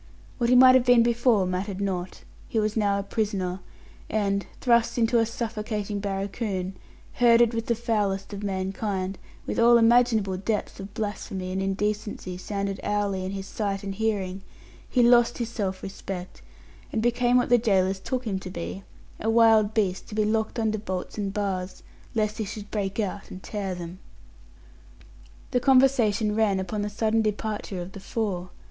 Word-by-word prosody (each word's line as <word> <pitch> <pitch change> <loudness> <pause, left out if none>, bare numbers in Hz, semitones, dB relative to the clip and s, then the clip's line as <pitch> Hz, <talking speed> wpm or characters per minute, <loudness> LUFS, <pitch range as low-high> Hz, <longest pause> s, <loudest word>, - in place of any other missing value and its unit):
What 235 -1 +2
he 250 - +5
might 255 0 +9
have 260 -1 +5
been 245 -2 +6
before 235 -4 +3
mattered 185 +2 -3
not. 185 -2 -3 0.3
He - - -2
was 215 0 0
now 205 -2 +2
a 200 - -2
prisoner, 195 -3 -2 0.5
and 200 -2 0
thrust 235 -1 +2
into 235 0 +3
a 225 - +2
suffocating 215 -3 -3
barracoon, 195 -1 -3 0.4
herded 235 -1 +5
with 230 0 -3
the 235 - +2
foulest 210 -4 -1
of 200 - -5
mankind, 190 -1 -2 0.3
with - - -2
all 235 +1 +7
imaginable 225 -4 +3
depths 205 +2 -2
of 195 +1 -9
blasphemy 195 -3 -4
and 190 +1 -2
indecency 205 -1 -2
sounded 200 0 -3
hourly 205 -2 -1
in 190 +1 -4
his 195 -1 -5
sight 200 -1 -3
and 195 -1 -4
hearing 195 -3 -2 0.5
he 250 - +3
lost 240 0 +5
his 235 -2 -3
self 195 -5 -3
respect, 190 -2 -7 0.5
and 220 - -1
became 240 +1 +3
what 245 -1 +1
his 245 - +6
gaolers 190 -4 +2
took 255 +5 -3
him 195 -4 -1
to 185 - -7
be 180 +2 -5 0.4
a 225 - -1
wild 225 -2 +5
beast 195 -4 0
to 210 - -8
be 215 -1 +2
locked 220 +2 0
under 220 -2 0
bolts 190 0 -5
and 200 -1 -1
bars, 190 -2 -3 0.3
lest 215 0 0
he - - 0
should 210 0 -7
break 200 -1 -2
out 205 -1 -3
and 185 - -9
tear 195 -3 -3
them. 175 +1 -8 1.5
The 250 - +2
conversation 240 -5 +3
ran 210 -3 +2
upon 205 +3 -3
the 205 - -2
sudden 220 +2 +1
departure 210 -2 -3
of 180 - -10
the 200 - -9
four. 195 -3 -3
210 Hz, 170 wpm, -26 LUFS, 195-225 Hz, 1.5 s, might